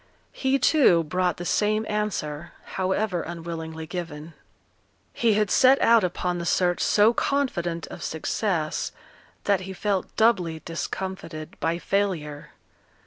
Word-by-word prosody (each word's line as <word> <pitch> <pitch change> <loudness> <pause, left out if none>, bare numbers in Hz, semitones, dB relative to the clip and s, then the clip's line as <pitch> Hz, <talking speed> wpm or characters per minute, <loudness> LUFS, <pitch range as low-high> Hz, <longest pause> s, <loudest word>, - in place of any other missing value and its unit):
He, 265 0 +1
too, 250 - +4
brought 180 +2 0
the 175 - -6
same 215 +3 +1
answer, 170 -7 -3
however 190 -1 -1
unwillingly 165 -1 -6
given. 165 -2 -6 0.8
He 230 -3 +2
had 210 -1 +1
set 265 +1 +6
out 230 -2 +5
upon 180 0 -1
the 170 - -4
search 175 -1 +2
so 215 +3 +4
confident 175 - -1
of - - -10
success, 160 0 -2 0.5
that 200 -2 +2
he 190 +1 -6
felt 195 -1 -2
doubly 180 -8 +2
discomfited 170 -2 -5
by 165 +1 0
failure. 175 -7 -2
180 Hz, 125 wpm, -25 LUFS, 165-210 Hz, 0.8 s, set